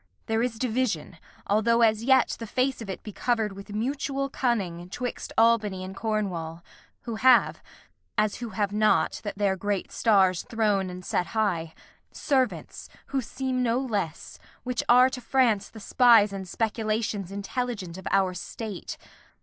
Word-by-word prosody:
There 225 0 0
is 240 -2 -1
division 220 -9 -2 0.3
(Although 230 +3 +3
as 220 0 +3
yet 265 0 +4
the 230 - -6
face 255 +3 0
of 215 - -7
it 190 - -6
be 210 - -7
cover'd 220 -1 0
With 200 +1 -11
mutual 275 +4 -2
cunning) 185 -10 -1
'twixt 245 +5 -5
Albany 215 -5 +3
and 190 +1 -7
Cornwall; 180 -7 -3 0.4
Who 230 -2 -5
have 255 +1 +4 0.6
(as 210 -1 +1
who 240 -2 -5
have 205 0 -2
not, 215 0 +2
that 205 -2 -5
their 200 -2 +1
great 200 0 -2
stars 190 -5 +3
Thron'd 210 -4 0
and 180 0 -8
set 180 - 0
high?) 170 -7 0 0.4
servants, 255 - -1 0.2
who 270 - +2
seem 255 +1 -3
no 235 -1 +1
less, 205 - -4 0.2
Which 250 -1 -1
are 250 +2 +7
to 255 - -6
France 230 -5 +2
the 220 - -12
spies 225 -2 +5
and 190 -1 -6
speculations 215 -2 -2
Intelligent 200 -3 -4
of 190 - -8
our 190 -2 +2
state. 200 +2 -6
215 Hz, 155 wpm, -26 LUFS, 195-245 Hz, 0.6 s, are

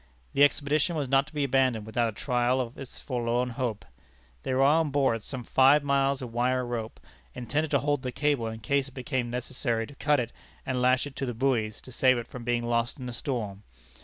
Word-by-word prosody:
The 140 - +5
expedition 145 +3 +2
was 145 -3 -1
not 135 +2 +3
to - - -13
be 145 -1 0
abandoned 130 -5 +2
without 115 +1 0
a - - -4
trial 125 +2 0
of 120 -2 -3
this 135 -2 -10
forlorn 125 -1 -1
hope. 115 -3 -3 0.6
There 130 - -1
were 135 - +4
on 155 +2 +4
board 135 -5 +1
some 125 +2 -6
five 135 +5 +5
miles 140 -1 +1
of 120 -2 -7
wire 125 +1 +1
rope, 115 -2 -5 0.4
intended 150 +5 -1
to 140 - +3
hold 145 -1 0
the 125 - -3
cable 145 -4 0
in 110 0 -6
case 140 +4 +1
it 135 - -15
became 130 -2 -2
necessary 120 -1 -2
to 145 - -13
cut 145 +1 +2
it 120 -1 -3 0.3
and 130 -1 -1
lash 130 +2 +3
it 140 -2 -9
to 135 - -2
the 120 - -3
buoys, 115 -4 0
to 130 - -13
save 130 +1 +3
it 120 - -4
from 125 - -9
being 120 0 0
lost 120 +3 -1
in 125 - -6
a - - -6
storm. 110 -6 -4
130 Hz, 220 wpm, -28 LUFS, 120-140 Hz, 0.6 s, The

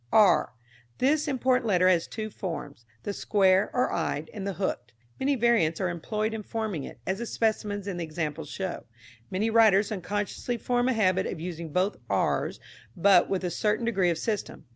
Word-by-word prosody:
r. 200 - +5 0.4
This 290 +4 +2
important 255 -3 +1
letter 185 -3 +4
has 175 -3 +3
two 215 -1 -5
forms 145 -11 -6 0.2
the 205 - -3
square, 190 -1 +3
or 250 0 +1
eyed, 150 +2 -2
and 200 -2 -5
the 195 - -2
hooked. 120 -10 -3 0.3
Many 275 +1 +2
variants 230 -10 +2
are 185 - 0
employed 215 +6 -2
in 220 - -4
forming 210 -8 -3
it, - - -11
as 190 +1 -1
the 235 - -4
specimens 210 -3 -1
in 190 -3 -3
the 175 - -2
examples 155 -1 -4
show. 190 -2 -4 0.4
Many 215 +4 0
writers 215 -3 +5
unconsciously 205 +5 -3
form 245 +2 0
a - - +2
habit 190 -4 +2
of 170 - -5
using 170 -1 -6
both 185 +6 +1
r's, - - 0 0.4
but 185 0 +5
with 190 -1 -1
a 180 - -1
certain 210 +6 0
degree 195 -6 +2
of 170 - 0
system. 210 +2 -3
195 Hz, 185 wpm, -27 LUFS, 175-220 Hz, 0.4 s, r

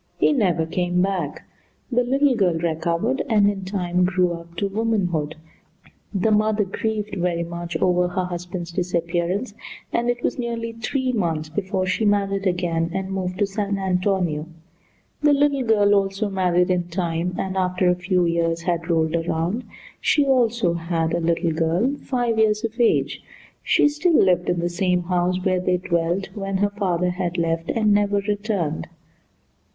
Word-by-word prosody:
He - - +3
never 180 - +1
came 180 +2 -1
back. 185 -7 -2 0.5
The 245 0 +3
little 270 +2 +2
girl 185 -6 +2
recovered 170 +9 -1
and 210 -3 +4
in 195 -2 -1
time 180 -2 0
grew 180 -1 +1
up 170 0 -10
to 200 +4 -1
womanhood. 195 -8 -1 0.8
The 205 +2 +1
mother 215 0 +3
grieved 210 +1 -3
very 170 -1 0
much 170 0 -5
over 180 +1 +2
her 185 0 -2
husband's 175 0 -5
disappearance, 175 +4 -1 0.4
and 240 +1 +1
it 245 0 -1
was - - -1
nearly 230 -1 -3
three 255 +3 -1
months 165 -9 -1
before 190 +2 -2
she 185 +4 0
married 200 -1 +1
again, 170 -2 0
and 190 0 -3
moved 185 -1 -3
to 205 - +2
San 200 0 -2
Antonio. 180 -4 0 0.7
The 295 -1 +5
little 285 -1 +2
girl 210 -4 +3
also 195 +1 0
married 180 -1 +2
in 180 -1 +1
time, 175 0 -2
and 190 0 -3
after 185 -1 +1
a 180 - +5
few 180 0 +1
years 170 0 0
had 170 -1 -2
rolled 160 -1 +1
around, 170 +7 -1 0.4
she 295 -2 +3
also 235 -8 +2
had 165 -1 -1
a 170 - +1
little 170 0 +1
girl 170 - +1
five 240 -5 -1
years 215 0 +2
of 230 +1 -4
age. 235 - +2 0.4
She - - +4
still 310 +3 +1
lived 180 -2 +3
in 175 -1 0
the 175 - 0
same 180 0 0
house 180 +1 0
where 185 -1 +2
they 180 0 +1
dwelt 175 +1 -1
when 195 -2 -2
her 205 +1 +1
father 180 -3 0
had 180 -1 -3
left 165 0 -1
and 215 -2 +2
never 205 0 +2
returned. 200 -6 -2
185 Hz, 165 wpm, -22 LUFS, 170-210 Hz, 0.8 s, The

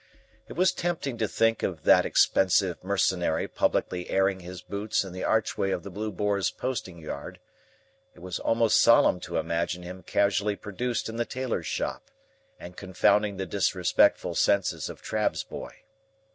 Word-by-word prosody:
It - - -8
was 185 +4 +3
tempting 160 -8 -3
to 110 - +1
think 115 +1 +1
of - - -3
that - - +5
expensive 95 -1 +2
Mercenary 95 -4 0
publicly 90 -1 -1
airing 95 0 +1
his 90 0 -9
boots 100 +1 -1
in 95 -2 -9
the 95 - -5
archway 110 -3 0
of 90 - -2
the 100 - -8
Blue 105 +3 -4
Boar's 100 -1 0
posting 115 -9 -4
yard; 80 -2 -7 0.8
it - - -16
was 90 0 -5
almost 115 -1 +3
solemn 115 -5 +5
to 90 -1 -5
imagine 85 +2 -2
him 90 +1 -8
casually 100 +1 +1
produced 115 +4 -3
in 115 0 -6
the 120 - +1
tailor's 125 -11 -3
shop, - - -3 0.5
and 90 +1 -10
confounding 100 +1 +1
the 95 - -3
disrespectful 95 -1 +2
senses 90 -6 +1
of - - -10
Trabb's - - -1
boy. - - -10
100 Hz, 160 wpm, -27 LUFS, 90-110 Hz, 0.8 s, that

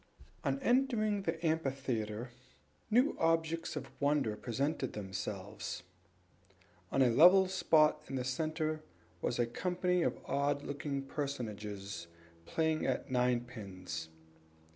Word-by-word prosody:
On - - +1
entering 235 -6 +2
the 165 -2 -2
amphitheatre, 130 -7 -1 0.6
new 245 +6 +4
objects 165 0 +1
of 140 -3 -5
wonder 140 -6 +2
presented 130 +4 -2
themselves. 95 0 -5 1.1
On 135 - +4
a 125 - +4
level 180 +9 +8
spot 155 -5 +4
in 135 - -4
the 130 - -1
center 155 +4 -1 0.4
was 120 - 0
a 120 - +3
company 180 +7 0
of - - +1
odd 140 +1 0
looking 140 -1 -3
personages 105 - -4 0.4
playing 160 -1 +1
at 130 0 -1
ninepins. 110 -9 -1
140 Hz, 110 wpm, -34 LUFS, 115-160 Hz, 1.1 s, level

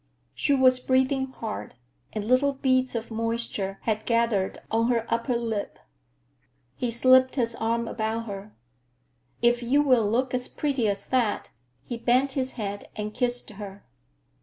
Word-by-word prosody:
She 285 - +2
was 255 -1 +5
breathing 260 +1 +1
hard, 225 - -6 0.4
and 210 -1 -4
little 255 +4 +3
beads 260 -2 +1
of 230 0 -4
moisture 225 -3 -2
had 215 -1 -1
gathered 230 -5 +1
on 225 +1 +2
her 235 -2 +1
upper 235 +2 0
lip. 225 -3 -3 1.0
He 245 - -1
slipped 255 +2 +5
his 235 -4 +1
arm 230 +1 -1
about 225 0 -2
her. 200 0 -8 0.9
"If 240 0 +4
you 270 +5 +3
will 250 -7 +3
look 250 +4 0
as 250 0 -1
pretty 275 -6 -1
as 200 -1 -2
that—" 245 -5 0 0.3
he 240 - -5
bent 250 +4 +2
his 265 -1 -1
head 205 -3 -5
and 210 0 -4
kissed 245 -2 -1
her. 200 -1 -9
235 Hz, 150 wpm, -26 LUFS, 220-255 Hz, 1.0 s, was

